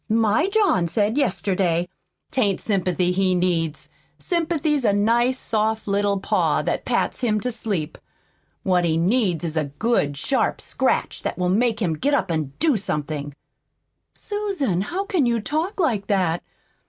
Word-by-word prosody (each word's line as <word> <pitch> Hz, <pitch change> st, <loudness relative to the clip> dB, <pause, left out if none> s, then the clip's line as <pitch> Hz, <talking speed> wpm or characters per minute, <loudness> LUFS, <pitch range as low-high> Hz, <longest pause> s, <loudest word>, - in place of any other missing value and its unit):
My 225 Hz, -, +3 dB
John 395 Hz, -, +2 dB
said 210 Hz, +5 st, 0 dB
yesterday 185 Hz, -, 0 dB, 0.2 s
" -, -, -51 dB
"'T 260 Hz, -, 0 dB
ain't 200 Hz, -4 st, +2 dB
sympathy 180 Hz, -3 st, 0 dB
he 185 Hz, 0 st, +2 dB
needs. 170 Hz, -4 st, 0 dB, 0.3 s
Sympathy's 320 Hz, -5 st, 0 dB
a 215 Hz, -, +4 dB
nice, 235 Hz, +5 st, +2 dB
soft 220 Hz, -2 st, -1 dB
little 200 Hz, 0 st, +1 dB
paw -, -, +1 dB
that -, -, -2 dB
pats -, -, 0 dB
him 215 Hz, -4 st, +1 dB
to 250 Hz, -, -1 dB
sleep. 200 Hz, -9 st, -3 dB, 0.6 s
What 180 Hz, -2 st, +2 dB
he 165 Hz, -2 st, +1 dB
needs 180 Hz, -1 st, +1 dB
is 160 Hz, -1 st, -3 dB
a 155 Hz, -2 st, +1 dB
good 145 Hz, -1 st, 0 dB
sharp 265 Hz, -, 0 dB
scratch -, -, -1 dB
that -, -, -3 dB
will 180 Hz, 0 st, 0 dB
make 225 Hz, +3 st, +1 dB
him 170 Hz, -3 st, +1 dB
get 280 Hz, -, +1 dB
up 190 Hz, -9 st, 0 dB
an' 155 Hz, -4 st, -2 dB
do 305 Hz, -7 st, +2 dB
somethin'." 150 Hz, -6 st, -4 dB, 0.8 s
"Susan, 390 Hz, -, -2 dB
how 370 Hz, -, -3 dB
can 340 Hz, -11 st, +1 dB
you 235 Hz, -1 st, +1 dB
talk 315 Hz, -, -2 dB
like 230 Hz, -, +1 dB
that?" 180 Hz, -4 st, +1 dB
205 Hz, 160 wpm, -23 LUFS, 175-255 Hz, 0.8 s, a